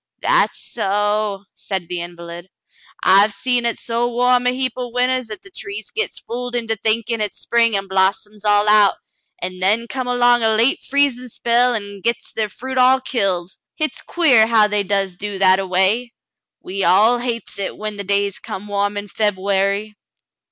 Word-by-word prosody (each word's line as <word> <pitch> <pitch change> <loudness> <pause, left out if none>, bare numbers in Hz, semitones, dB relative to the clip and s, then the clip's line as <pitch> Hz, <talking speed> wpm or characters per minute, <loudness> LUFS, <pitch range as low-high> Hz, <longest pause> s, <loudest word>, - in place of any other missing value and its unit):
"That's - - +2
so," 205 0 -1
said 190 -4 -5
the 175 0 -3
invalid. 170 +1 -9 0.5
"I 195 +1 +6
hev 210 +1 +3
seen 240 +3 0
it 235 - -2
so 235 +1 -1
warm 250 +1 +2
a - - +5
heap 255 -1 -1
o' 250 -1 -5
winters 250 0 0
'at 215 - -8
the 390 - -14
trees 400 +2 -7
gits 450 - -3
fooled 245 +1 -5
into 225 -2 -1
thinkin' 225 +2 -1
hit's 210 -1 -3
spring 230 -2 +2
an' 195 - -4
blossoms 195 +2 -1
all 205 0 +3
out, 210 -1 +5 0.5
an' 185 0 -4
then 215 +5 +1
come 255 +1 -4
along 245 -1 +3
a 220 -1 +2
late 235 +5 +3
freez'n' 270 -3 0
spell 240 +2 +2
an' 200 -2 -6
gits 235 +4 -2
ther 215 -1 -2
fruit 260 +5 -4
all 255 +1 +5
killed. 195 -9 -1 0.2
Hit's 310 0 -2
quare 260 -11 +3
how 225 -2 +4
they 210 0 0
does 195 -2 -1
do 205 +1 -5
that 190 0 +4
a 195 - -3
way. 195 +7 +1 0.5
We 195 +1 -3
all 210 +8 +4
hates 235 -4 -4
it 195 - -4
when 215 -1 -5
the 200 - -4
days 200 0 -1
come 195 - -7
warm 205 0 -1
in 205 0 -5
Feb'uary." 200 0 -1
215 Hz, 180 wpm, -19 LUFS, 200-245 Hz, 0.5 s, I